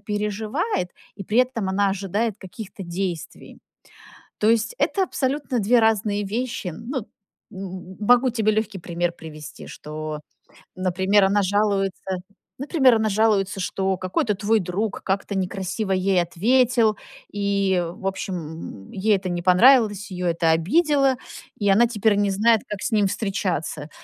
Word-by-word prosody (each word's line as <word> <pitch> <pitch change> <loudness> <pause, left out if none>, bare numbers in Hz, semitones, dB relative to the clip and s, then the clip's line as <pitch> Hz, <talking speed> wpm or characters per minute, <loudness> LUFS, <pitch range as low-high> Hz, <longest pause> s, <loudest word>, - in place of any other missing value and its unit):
переживает, 210 - -2 0.3
и 195 - -7
при 215 +6 0
этом 250 -6 +1
она 200 +1 +2
ожидает 200 +3 -1
каких-то 195 +1 -9
действий. 175 -1 -5 0.8
То 215 - +3
есть, 230 - +1
это 390 - +2
абсолютно 275 -5 -1
2 235 +4 +4
разные 210 -2 +1
вещи. 220 -4 -3
Ну, 260 - -4
м 215 - -9 0.5
м 185 -1 -7
м - - -17
могу 245 +4 +4
тебе 220 -2 +1
легкий 215 -2 -2
пример 175 0 -2
привести. 155 -3 -10
Что, 155 0 -6 0.5
например, 190 +2 +2
она 200 +2 +2
жалуется, 195 -1 0 0.4
например, 270 -3 +4
она 220 -1 +1
жалуется, 200 -2 +1
что 190 +1 -1
какой-то 185 +3 -1
твой 215 +3 +2
друг 195 +3 -3
как-то 195 +1 -2
некрасиво 195 +2 -3
ей 185 -1 +2
ответил, 225 +5 +2 0.3
и, 200 -3 +1
в 180 +3 -6
общем, 195 0 -3 0.5
м, - - -13
ей 205 +2 +2
это 190 -1 -5
не 175 -1 -3
понравилось, 210 +2 +5
ее 180 -1 -1
это 165 -1 +2
обидело, 275 - +3 0.4
и 205 -1 0
она 220 +5 +5
теперь 220 -2 +1
не 205 0 +1
знает, 220 +2 +3
как 205 -2 -5
с - - -2
ним 210 -2 +3
встречаться. 185 -7 -2
200 Hz, 145 wpm, -23 LUFS, 185-225 Hz, 0.8 s, понравилось